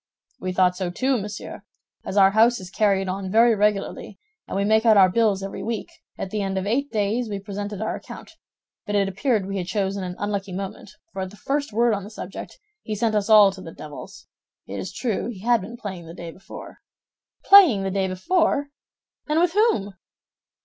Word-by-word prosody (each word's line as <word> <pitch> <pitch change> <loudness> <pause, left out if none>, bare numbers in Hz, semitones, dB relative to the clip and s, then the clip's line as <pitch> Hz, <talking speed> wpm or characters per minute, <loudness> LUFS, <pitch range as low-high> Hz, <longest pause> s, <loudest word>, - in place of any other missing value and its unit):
"We 185 - -3
thought 180 0 +3
so, 185 -1 -3
too, 255 +7 0
monsieur. 205 0 -7 0.4
As 195 - -4
our 195 -1 +6
house 230 +3 +4
is 185 -1 -10
carried 195 -3 +1
on 190 +1 -3
very 230 +2 +5
regularly, 210 -1 -1 0.3
and - - -4
we 200 - +1
make 220 +1 +3
out 220 -3 +5
our 185 -2 +6
bills 205 -2 +2
every 195 - -6
week, 225 -2 -4 0.3
at 185 - -5
the 210 - -2
end 195 -1 -2
of 190 - -2
eight 270 +7 -1
days 220 +2 0
we 205 - -3
presented 205 +1 -5
our 220 - -2
account; - - -11 0.6
but 205 - -2
it 200 -1 +2
appeared 195 +2 0
we 195 0 -3
had 175 - -4
chosen 195 0 -1
an 180 -1 -5
unlucky 200 -2 -3
moment, 195 +2 -6 0.2
for 190 - -4
at 190 - -4
the 205 - -15
first 280 +7 -2
word 235 +2 +2
on 200 -2 -3
the 205 - -9
subject, 200 -3 -8 0.2
he 215 - -4
sent 220 +1 0
us 205 -1 0
to 220 - +5
all 205 -2 +8
the 185 -4 -10
devils. 150 -2 -10 0.4
It - - -6
is - - -5
true 230 -5 -2
he 215 -6 -7
had 235 0 +3
been 230 +6 -8
playing 190 -7 -7
the 165 - -10
day 170 -2 -7
before." 185 - -11 0.7
"Playing 355 - +7
the 195 - -2
day 190 0 0
before! 285 - +1 0.6
And 305 +2 +2
with 345 0 +2
whom?" 405 - +2
205 Hz, 210 wpm, -23 LUFS, 190-225 Hz, 0.7 s, all